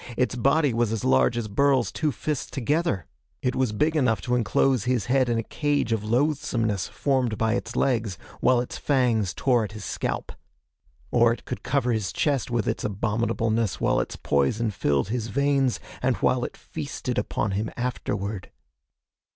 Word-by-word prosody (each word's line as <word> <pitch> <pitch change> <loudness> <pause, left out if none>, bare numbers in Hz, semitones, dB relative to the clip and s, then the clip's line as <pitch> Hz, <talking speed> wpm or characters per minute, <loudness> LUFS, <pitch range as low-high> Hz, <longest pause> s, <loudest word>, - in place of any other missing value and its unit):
Its 125 0 +1
body 140 +2 +3
was 115 -1 +1
as 110 -3 -2
large 65 - +3
as 115 -2 -2
Burl's 130 +3 +2
two 155 -2 0
fists 150 0 -3
together. 140 - 0 0.4
It 125 - 0
was 130 -4 +1
big 150 +9 +1
enough 125 -7 +2
to 125 - -2
enclose 125 0 +2
his 125 -4 +1
head 130 0 +2
in 120 - +1
a 115 - -1
cage 145 -2 -1
of 110 -2 0
loathesomeness 115 - 0
formed 130 -6 0
by 110 0 +1
its - - -3
legs, 115 -8 0 0.2
while 125 -1 +4
its 125 - -6
fangs 120 -8 +2
tore 125 0 +2
at 105 - -6
his 105 -2 -7
scalp. - - -3 0.8
Or 120 -1 +5
it 120 - -5
could - - -5
cover 130 -3 0
his 105 -4 -1
chest 140 -5 0
with 120 -3 0
its - - -1
abominableness 110 +1 0
while - - +2
its - - -3
poison 90 +12 +1
filled 75 -4 0
his 115 -1 -2
veins, 140 -1 +1 0.2
and - - +2
while - - +1
it - - -8
feasted - - -4
upon - - -1
him 105 +3 -1
afterward.... 105 -5 -3
120 Hz, 175 wpm, -25 LUFS, 105-130 Hz, 0.8 s, Or